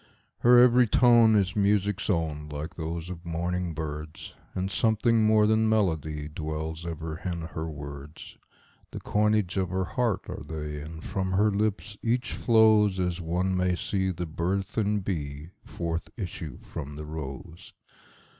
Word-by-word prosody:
Her 120 +1 +6
every 125 0 +6
tone 120 -1 +6
is 95 -4 +2
music's 100 -1 +1
own, 80 -5 -1
like 75 +2 -5
those 85 +1 -5
of 85 -1 -8
morning 85 0 -2
birds, 75 0 -6 0.2
And 95 +1 -2
something 110 +2 +3
more 110 -1 +5
than 110 +1 +3
melody 80 -8 0
dwells 80 +1 -5
ever 80 -1 -5
in 90 -2 -3
her 80 0 -5
words; 70 0 -9 0.5
The - - -7
coinage 105 -3 +1
of 95 -2 0
her 95 +1 -1
heart 115 +2 -1
are - - -6
they, 75 -2 -5
and 80 +1 -9
from 95 -1 -2
her 105 +3 +3
lips 105 0 -1
each 120 +2 0
flowsAs 105 -6 +3
one 90 +3 0
may 90 0 +1
see 95 +1 -1
the 90 -1 -3
burthened 95 +5 -1
bee 75 -3 -4
forth 85 -1 -4
issue 85 -6 -6
from 75 -2 -7
the 75 +1 -7
rose. 80 +3 -8
90 Hz, 145 wpm, -27 LUFS, 80-105 Hz, 0.5 s, Her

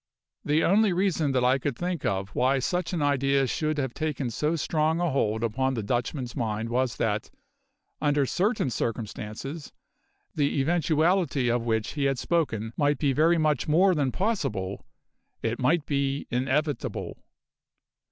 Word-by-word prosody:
The 150 +2 +2
only 205 +1 +4
reason 175 -6 +1
that 130 -1 +2
I 130 +2 +3
could 135 -2 -3
think 175 -3 -3
of 95 0 -1
why 130 +5 +2
such 175 +6 -1
an 170 -5 -1
idea 140 -1 +2
should 155 +4 -1
have 135 -4 -2
taken 145 -5 -2
so 150 +7 0
strong 160 +1 0
a 175 -2 +1
hold 110 -4 0
upon 130 +4 0
the 110 - -3
Dutchman's 120 +3 -2
mind 110 -1 -2
was 125 0 0
that, 105 -1 -1 0.7
under 145 -1 +2
certain 190 - 0
circumstances, 115 +7 -4 0.6
the 145 -1 0
eventuality 160 -3 +2
of 120 0 -1
which 110 -2 0
he 145 -2 -1
had 135 -1 +1
spoken 115 -10 -1
might 145 -1 +2
be 140 -1 +1
very 165 +5 +4
much 155 -5 +1
more 180 +5 +4
than 140 -5 0
possible: 110 - -2 0.6
it 115 +1 -1
might 150 +5 +2
be 140 -1 -1
inevitable. 135 +4 -1
140 Hz, 150 wpm, -27 LUFS, 120-160 Hz, 0.7 s, only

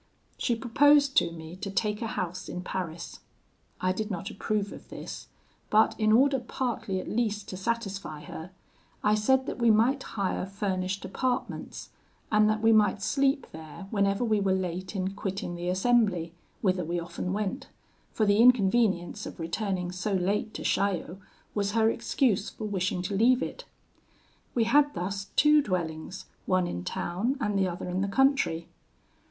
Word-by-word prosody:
She 240 - 0
proposed 280 +4 +4
to - - +4
me 160 0 -9
to 200 +1 -5
take 210 +2 -1
a 230 - -1
house 185 -2 -4
in 180 - -5
Paris. 170 -3 -5 0.6
I 185 - +1
did 210 +3 -3
not 195 +2 -4
approve 205 -1 -2
of - - -12
this; - - -8 0.4
but, 215 +1 +4
in 215 0 +3
order 270 +4 +5
partly 235 -5 -3
at - - -7
least 215 -3 -1
to - - -5
satisfy 195 -7 -3
her, 160 +3 -8 0.5
I 210 - +4
said 260 +5 +3
that - - -5
we 235 -1 +4
might 235 +6 +4
hire 195 -4 -2
furnished 195 -1 -2
apartments, 250 +6 -3 0.4
and 215 0 +5
that 215 +1 0
we 225 - +6
might 210 -2 +3
sleep 275 +4 +1
there 160 +4 -9
whenever 200 +1 +1
we 215 -2 +2
were 190 -1 +2
late 185 +1 -3
in 190 0 -1
quitting 195 -2 -4
the 175 +1 -3
assembly, 190 -4 +2 0.3
whither 185 -2 +1
we 170 +2 -2
often 175 +1 -4
went; 210 +5 -2 0.4
for 215 - +1
the 205 0 +4
inconvenience 225 -6 +3
of - - -10
returning 180 +1 -2
so 190 +3 -2
late 195 +3 0
to - - -5
Chaillot 190 -2 0 0.3
was 205 -1 -1
her 225 0 +4
excuse 230 -4 +1
for 215 - -7
wishing 185 -3 -1
to 195 +2 -2
leave 245 +5 +4
it. - - -6 0.9
We 235 - +3
had 290 +5 +3
thus 195 +2 -3
two 300 +1 +6
dwellings, 175 - -3 0.2
one 185 -1 +2
in 90 - -4
town 200 - -2
and 210 -6 -1
the 195 -1 +2
other 175 0 -5
in 180 +1 -1
the 200 - 0
country. 235 - +2
200 Hz, 170 wpm, -28 LUFS, 185-230 Hz, 0.9 s, we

